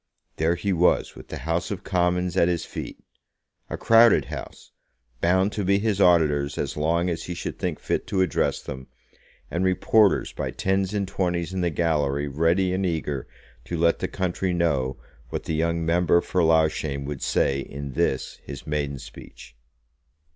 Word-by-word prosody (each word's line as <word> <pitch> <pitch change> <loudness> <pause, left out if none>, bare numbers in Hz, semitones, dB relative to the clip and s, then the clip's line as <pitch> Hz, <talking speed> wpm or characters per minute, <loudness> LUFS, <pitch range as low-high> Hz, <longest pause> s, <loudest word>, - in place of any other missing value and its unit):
There 80 +2 +2
he 100 +2 -1
was 90 0 +2
with - - -12
the - - -6
House 85 +1 -1
of 100 -3 -5
Commons 90 -1 0
at 85 - +4
his 85 -2 -1
feet, - - -7 0.7
a - - -4
crowded 115 -1 +5
House, - - -9 0.5
bound 95 +3 +3
to 105 - -3
be 100 +1 +3
his 100 -1 0
auditors 75 -6 +3
as - - -2
long 85 +4 +1
as 85 -2 -3
he 90 - -5
should 85 - -5
think - - -2
fit - - -2
to 95 - 0
address 90 - 0
them, 65 0 -7 0.6
and 85 +2 -1
reporters 95 +2 +3
by - - -3
tens 95 +1 -1
and 100 -2 -1
twenties 90 -2 -2
in 95 - -1
the 90 - +1
gallery 75 -4 0
ready 85 +6 +1
and 95 +1 -1
eager 75 -6 -2 0.4
to 85 - -4
let 85 +1 +2
the - - -1
country 95 0 -2
know 70 -7 0 0.3
what - - -4
the - - -3
young 85 +1 0
member 85 +1 +3
for 90 +1 -1
Loughshane 80 -3 +1
would 70 -1 -5
say 70 0 +1
in 70 +1 -6
this - - -1
his 70 -1 -9
maiden 75 -2 -2
speech. 65 -1 -12
85 Hz, 175 wpm, -25 LUFS, 75-95 Hz, 0.7 s, crowded